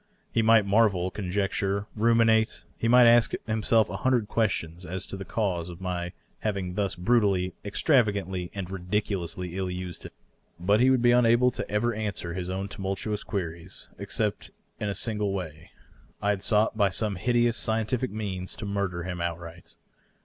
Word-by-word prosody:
He 115 - +2
might 115 -2 +5
marvel, 100 -3 +3
conjecture, 100 +1 -1
ruminate; 115 0 +3
he 115 - -2
might 125 +1 +7
ask 120 0 +5
himself 110 0 +2
a 95 - -5
hundred 120 0 +1
questions 90 -7 -1
as 90 +1 -4
to - - -7
the 95 0 -7
cause 90 -6 -1
of 85 - -9
my 90 -1 -3 0.3
having 100 -4 -2
thus 100 0 -1
brutally, 95 -2 +2
extravagantly 100 - +1
and 95 -2 -5
ridiculously 90 -2 -3
ill 95 -1 -2
used 90 -1 -6
him; - - -9 0.5
but 100 +5 +3
he 130 +2 +5
would 130 -2 +3
be 120 - +6
unable 120 +1 +5 0.2
ever 105 +4 +1
to 110 - -6
answer 100 -5 -3
his 90 0 -4
own 95 +1 -3
tumultuous 100 +2 -3
queries 85 -2 -5
except - - -1 0.3
in 105 - -2
a 100 - -2
single 105 -3 -1
way 80 -5 -6 0.3
— - - -30
I 105 - +1
had 100 -2 -2
sought 105 +2 +2
by 100 -2 +3
some 105 +1 0
hideous 120 +3 +1
scien 110 -1 0
tific 125 +3 -1
means 95 -4 -4
to - - -6
murder 100 -4 -2
him 90 -1 -4
outright. 85 0 -6
100 Hz, 170 wpm, -27 LUFS, 90-110 Hz, 0.5 s, might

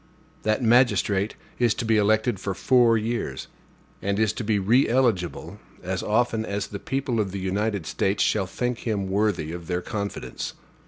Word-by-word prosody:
That 110 +3 0
magistrate 110 -4 +3 0.2
is 120 -3 +3
to 120 - -3
be 110 0 +3
elected 110 +1 +2
for 100 -1 -3
four 120 -1 +4
years; 110 - -3 0.5
and 100 0 -1
is 110 -1 +2
to - - -4
be 105 -1 +1
re 115 +7 +3
eligible 105 -6 0 0.2
as 95 +1 -2
often 110 0 +1
as 100 -1 -2
the 100 - -6
people 130 -2 -2
of 100 -3 0
the 100 - -4
United 100 0 -1
States 95 +5 0
shall 95 - +1
think 125 +5 -2
him 105 -4 -2
worthy 100 -5 0
of 85 -1 -7
their 90 0 -2
confidence. 100 -2 -4
105 Hz, 170 wpm, -25 LUFS, 95-115 Hz, 0.5 s, four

